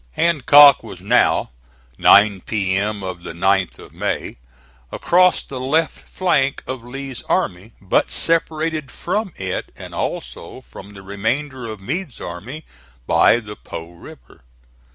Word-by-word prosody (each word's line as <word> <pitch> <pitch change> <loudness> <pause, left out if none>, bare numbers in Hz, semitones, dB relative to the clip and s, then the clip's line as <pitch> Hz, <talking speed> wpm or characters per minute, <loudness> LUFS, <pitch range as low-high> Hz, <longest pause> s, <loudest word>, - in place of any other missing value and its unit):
Hancock 145 - +6
was 105 -6 -10
now, 105 - +2 0.4
nine 100 - +5
P.M. 100 0 -1
of 90 -2 -6
the 80 - -8
9th 95 +1 +1
of - - -14
May, - - -3 0.5
across 180 0 +3
the 130 - -8
left 155 +5 -1
flank 140 -7 0
of 130 -2 -6
Lee's 135 +1 -7
army, 110 - -1
but 95 - +1
separated 160 -3 0
from 195 +6 -3
it, 95 -1 -4
and - - -10
also - - -5
from 95 +12 -13
the 95 -1 -12
remainder 115 +6 -3
of 110 -2 -7
Meade's 145 - -5
army, 120 - -8 0.4
by 120 - +4
the 105 -2 -9
Po 85 -3 -9
River. 65 -8 -15
115 Hz, 130 wpm, -20 LUFS, 95-145 Hz, 0.5 s, Hancock